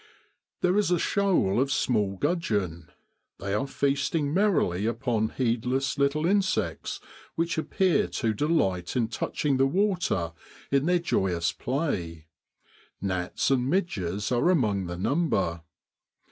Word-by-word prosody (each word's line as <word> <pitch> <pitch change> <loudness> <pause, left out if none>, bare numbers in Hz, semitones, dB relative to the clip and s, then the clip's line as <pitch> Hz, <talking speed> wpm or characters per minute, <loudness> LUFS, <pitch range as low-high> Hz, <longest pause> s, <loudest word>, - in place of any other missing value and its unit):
There 180 +3 +3
is 210 - +1
a 180 - +3
shoal 175 - +2
of 135 +1 0
small 105 -7 +1
gudgeon; 100 - -1 0.5
they 100 0 -4
are 105 +7 0
feasting 140 +2 0
merrily 160 - +2
upon 115 -2 0
heedless 125 +2 0
little 140 +3 +2
insects 190 +1 0 0.4
which 165 +1 0
appear 180 +2 +1
to 115 -3 -1
delight 95 - 0
in 115 -3 +1
touching 135 +3 -1
the 135 +1 +4
water 175 - 0 0.4
in 140 +2 +2
their 180 0 +4
joy 95 - 0
ous 85 0 0
play: 100 - -3 0.7
gnats 90 +5 -1
and 130 -1 +2
midges 105 - -1
are 125 +8 +3
among 105 - +1
the 85 0 -5
number. 95 - 0
130 Hz, 130 wpm, -27 LUFS, -, 0.7 s, the